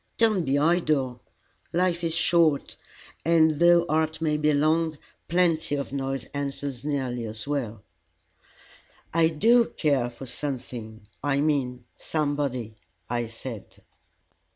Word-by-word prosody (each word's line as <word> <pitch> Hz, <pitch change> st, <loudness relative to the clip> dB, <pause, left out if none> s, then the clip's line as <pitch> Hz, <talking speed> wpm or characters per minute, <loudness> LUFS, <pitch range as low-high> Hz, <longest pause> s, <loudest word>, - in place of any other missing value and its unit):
Don't 215 Hz, -7 st, +3 dB
be 135 Hz, +1 st, +2 dB
idle. 145 Hz, -6 st, +1 dB, 0.5 s
Life 175 Hz, 0 st, +1 dB
is 165 Hz, -1 st, 0 dB
short, 165 Hz, -3 st, +2 dB, 0.5 s
and 160 Hz, -1 st, +5 dB
though 170 Hz, 0 st, +6 dB
art 160 Hz, 0 st, 0 dB
may 155 Hz, -2 st, +1 dB
be 150 Hz, 0 st, +2 dB
long, 155 Hz, +2 st, +2 dB, 0.3 s
plenty 165 Hz, -3 st, +2 dB
of 140 Hz, -1 st, -4 dB
noise 135 Hz, -1 st, -2 dB
answers 140 Hz, -2 st, -4 dB
nearly 130 Hz, -5 st, -2 dB
as 110 Hz, +3 st, -5 dB
well." 120 Hz, -8 st, -3 dB, 1.3 s
"I 165 Hz, 0 st, +4 dB
do 230 Hz, +10 st, +4 dB
care 140 Hz, -6 st, +1 dB
for 120 Hz, +2 st, -10 dB
something 120 Hz, -5 st, -5 dB, 0.2 s
I 140 Hz, -1 st, +1 dB
mean, 130 Hz, -5 st, 0 dB
somebody," 140 Hz, -7 st, -2 dB, 0.3 s
I 120 Hz, -1 st, -1 dB
said. 115 Hz, -1 st, -9 dB
145 Hz, 120 wpm, -26 LUFS, 130-160 Hz, 1.3 s, though